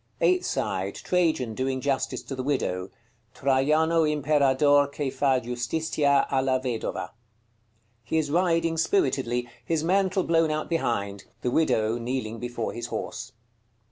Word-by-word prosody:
Eighth 365 0 +2
side. - - -2
Trajan 160 -10 0
doing 130 +3 -1
justice 135 0 -1
to - - -7
the 130 - -3
Widow. 95 -9 -1 0.5
"TRAJANO 155 +5 +2
IMPERADOR 145 -1 +3
CHE 140 -3 -2
FA 135 -2 +2
JUSTITIA 140 +4 0
A 135 -1 +2
LA 130 -1 +2
VEDOVA." 125 -3 -3 0.9
He 125 +8 -1
is 150 -2 0
riding 165 -1 +2
spiritedly, 130 - +1 0.2
his 160 -2 -1
mantle 190 +1 +2
blown 165 -1 +2
out 155 0 -2
behind: 100 -11 -1 0.2
the 125 - 0
widow 115 -7 +1
kneeling 115 -2 -3
before 120 -1 -4
his 120 0 -5
horse. - - -5
140 Hz, 135 wpm, -26 LUFS, 125-160 Hz, 0.9 s, IMPERADOR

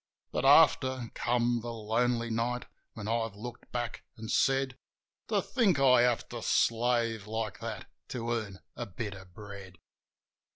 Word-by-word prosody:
Biit, - - 0
after, 130 -3 +5
came 120 0 +1
the 120 +1 -5
lonely 115 +1 0
night, 120 +2 -1 0.3
when 105 -2 -7
I've 115 -2 -1
looked 120 +4 -9
back 120 -2 -3 0.2
an' 110 0 -7
said, 135 -1 +2 0.5
"To - - +1
think 215 - +2
I 130 -3 +6
have 120 -1 +2
to - - -6
slave 115 -2 +1
like 110 -2 -3
that - - -5 0.2
to 120 -1 -3
earn 105 -5 -3
a - - -5
bit 105 +2 -5
of 95 -2 -13
bread 100 -3 -10
115 Hz, 150 wpm, -30 LUFS, 110-125 Hz, 0.5 s, I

